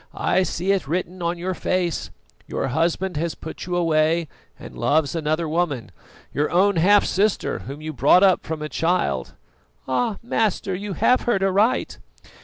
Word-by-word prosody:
"I -, -, +1 dB
see 185 Hz, +1 st, -1 dB
it 195 Hz, -7 st, 0 dB
written 180 Hz, +3 st, -3 dB
on 170 Hz, +1 st, -1 dB
your 185 Hz, +2 st, -3 dB
face; 180 Hz, -2 st, -1 dB, 0.4 s
your -, -, -2 dB
husband 165 Hz, +4 st, 0 dB
has 165 Hz, +1 st, -2 dB
put 160 Hz, -, -8 dB
you 180 Hz, -, -2 dB
away 165 Hz, -1 st, +2 dB, 0.3 s
and -, -, -11 dB
loves 145 Hz, 0 st, +1 dB
another 160 Hz, 0 st, -1 dB
woman, 150 Hz, -, -1 dB, 0.4 s
your 150 Hz, +1 st, 0 dB
own 190 Hz, +2 st, +3 dB
half 200 Hz, +5 st, +5 dB
sister 205 Hz, +2 st, 0 dB
whom 140 Hz, +3 st, -8 dB
you 155 Hz, 0 st, -5 dB
brought 145 Hz, +8 st, +5 dB
up 190 Hz, -2 st, +4 dB
from 155 Hz, -1 st, -5 dB
a -, -, -3 dB
child." 175 Hz, +3 st, -1 dB, 0.5 s
"Ah! 210 Hz, -, 0 dB
master, 215 Hz, -4 st, 0 dB
you 200 Hz, +2 st, -4 dB
have 250 Hz, +9 st, +3 dB
heard 195 Hz, -5 st, +2 dB
aright." 200 Hz, +5 st, +1 dB
175 Hz, 165 wpm, -22 LUFS, 155-190 Hz, 0.5 s, half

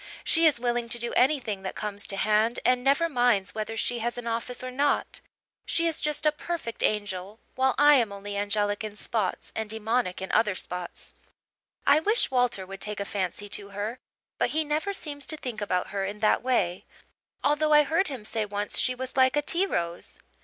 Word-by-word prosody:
She 330 Hz, 0 st, +4 dB
is 295 Hz, -6 st, +2 dB
willing 240 Hz, -1 st, -1 dB
to 240 Hz, -, 0 dB
do 235 Hz, 0 st, -3 dB
anything 250 Hz, -7 st, +2 dB
that 190 Hz, -, -5 dB
comes 205 Hz, -1 st, -3 dB
to 195 Hz, -, -1 dB
hand 215 Hz, +3 st, +2 dB
and 250 Hz, 0 st, +3 dB
never 280 Hz, +5 st, +3 dB
minds 245 Hz, -, +2 dB
whether 220 Hz, +1 st, -4 dB
she 240 Hz, +2 st, 0 dB
has 240 Hz, +2 st, -2 dB
an 245 Hz, -, -6 dB
office 235 Hz, +2 st, -3 dB
or 255 Hz, -, -4 dB
not. 285 Hz, +3 st, +1 dB, 0.4 s
She 335 Hz, -, 0 dB
is 330 Hz, -1 st, 0 dB
just 300 Hz, 0 st, -1 dB
a 305 Hz, -, +6 dB
perfect 305 Hz, -6 st, -5 dB
angel, 205 Hz, 0 st, -1 dB
while 260 Hz, 0 st, +2 dB
I 290 Hz, 0 st, +7 dB
am 230 Hz, -5 st, +1 dB
only 200 Hz, 0 st, -6 dB
angelic 205 Hz, +1 st, 0 dB
in 215 Hz, -1 st, -5 dB
spots 210 Hz, -3 st, -1 dB
and 220 Hz, -1 st, -3 dB
demonic 220 Hz, -2 st, -1 dB
in 190 Hz, -, -5 dB
other 210 Hz, -3 st, +3 dB
spots. 180 Hz, -1 st, -5 dB, 0.7 s
I 285 Hz, +2 st, +6 dB
wish 420 Hz, -, +2 dB
Walter 245 Hz, -7 st, +1 dB
would 195 Hz, +1 st, -9 dB
take 210 Hz, -1 st, -1 dB
a 200 Hz, -, -2 dB
fancy 200 Hz, 0 st, -3 dB
to 200 Hz, -1 st, -4 dB
her, 215 Hz, +5 st, -3 dB, 0.4 s
but -, -, +2 dB
he 315 Hz, +1 st, +1 dB
never 305 Hz, +6 st, -1 dB
seems 290 Hz, -7 st, -4 dB
to 310 Hz, -, 0 dB
think 245 Hz, -7 st, -5 dB
about 180 Hz, -3 st, -1 dB
her 195 Hz, 0 st, -2 dB
in 200 Hz, +2 st, -4 dB
that 215 Hz, -, +3 dB
way, 195 Hz, -9 st, 0 dB, 0.6 s
although 305 Hz, +1 st, +2 dB
I 300 Hz, 0 st, +7 dB
heard 330 Hz, +6 st, +1 dB
him 255 Hz, -7 st, -7 dB
say 220 Hz, 0 st, -1 dB
once 205 Hz, 0 st, 0 dB
she 255 Hz, -, +1 dB
was 260 Hz, +1 st, -6 dB
like 260 Hz, 0 st, +4 dB
a 295 Hz, -, +2 dB
tea 355 Hz, +6 st, +1 dB
rose. 170 Hz, -, -3 dB
235 Hz, 205 wpm, -27 LUFS, 205-280 Hz, 0.7 s, I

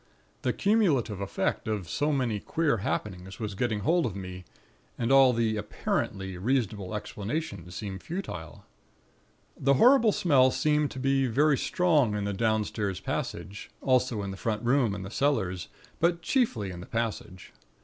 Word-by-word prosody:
The -, -, +1 dB
cumulative 155 Hz, -, +1 dB
effect 100 Hz, -, -2 dB
of 105 Hz, -5 st, -2 dB
so 145 Hz, -, 0 dB
many 125 Hz, -7 st, 0 dB
queer 155 Hz, +2 st, 0 dB
happenings 95 Hz, -2 st, -4 dB
was 105 Hz, -3 st, -3 dB
getting 110 Hz, 0 st, -1 dB
hold 170 Hz, -, +2 dB
of 100 Hz, -, -6 dB
me; 90 Hz, -1 st, -7 dB, 0.5 s
and 120 Hz, +1 st, -1 dB
all 135 Hz, -1 st, +7 dB
the 115 Hz, -2 st, 0 dB
apparently 95 Hz, -2 st, -3 dB
reasonable 105 Hz, -3 st, -1 dB
explanations 100 Hz, -, -5 dB
seemed 95 Hz, 0 st, -5 dB
futile. 90 Hz, -, -6 dB, 0.9 s
"The 140 Hz, +1 st, +2 dB
horrible 235 Hz, -, +6 dB
smell 140 Hz, -10 st, +4 dB
seemed 150 Hz, +2 st, +1 dB
to 130 Hz, -, -7 dB
be 135 Hz, 0 st, +2 dB
very 145 Hz, +5 st, +3 dB
strong 155 Hz, -, +2 dB
in 105 Hz, -, -2 dB
the 100 Hz, 0 st, -2 dB
downstairs 105 Hz, -3 st, -1 dB
passage; 100 Hz, +1 st, -5 dB
also 125 Hz, -5 st, +1 dB
in 100 Hz, -, -4 dB
the 95 Hz, -, -7 dB
front 110 Hz, +2 st, -2 dB
room 120 Hz, -4 st, +2 dB
and 95 Hz, -2 st, -6 dB
the 95 Hz, -, -8 dB
cellars; 110 Hz, -11 st, 0 dB, 0.3 s
but 170 Hz, 0 st, +1 dB
chiefly 130 Hz, -, 0 dB
in 90 Hz, -, -8 dB
the 90 Hz, -, -9 dB
passage. 110 Hz, -5 st, -4 dB
115 Hz, 155 wpm, -28 LUFS, 100-140 Hz, 0.9 s, all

